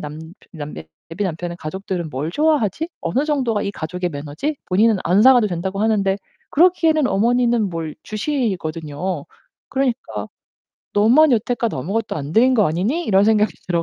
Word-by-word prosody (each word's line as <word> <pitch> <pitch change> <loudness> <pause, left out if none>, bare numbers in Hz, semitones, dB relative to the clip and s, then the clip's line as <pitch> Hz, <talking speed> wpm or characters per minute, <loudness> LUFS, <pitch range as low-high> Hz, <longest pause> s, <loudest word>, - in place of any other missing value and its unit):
남 150 +1 -7 0.3
남 150 -3 -7 0.4
예비 195 +5 -3
남편의 175 -1 -4
가족들은 175 0 -4
뭘 145 +4 -3
좋아하지? 300 - +1
어느 250 - 0
정도가 260 -8 0
이 200 - -2
가족의 180 0 -4
매너지?' 150 - -4
본인은 210 +3 +3
안 185 +5 +4
사가도 245 -3 +6
된다고 190 +2 -3
하는데 205 -3 +2 0.3
그러기에는 325 -3 +3
어머니는 235 0 +2
뭘 165 -2 -5
주시거든요. 180 - -3 0.5
그러니까 265 -2 -2 0.7
'너만 250 +9 +5
여태껏 235 0 0
아무것도 205 - -2
안 145 0 -5
드린 250 +6 +4
거 215 -4 +4
아니니?' 210 - -1
이런 195 -5 +3
생각이 210 -3 +3 0.2
들어 170 -2 +1
205 Hz, 360 characters per minute, -20 LUFS, 170-245 Hz, 0.7 s, 사가도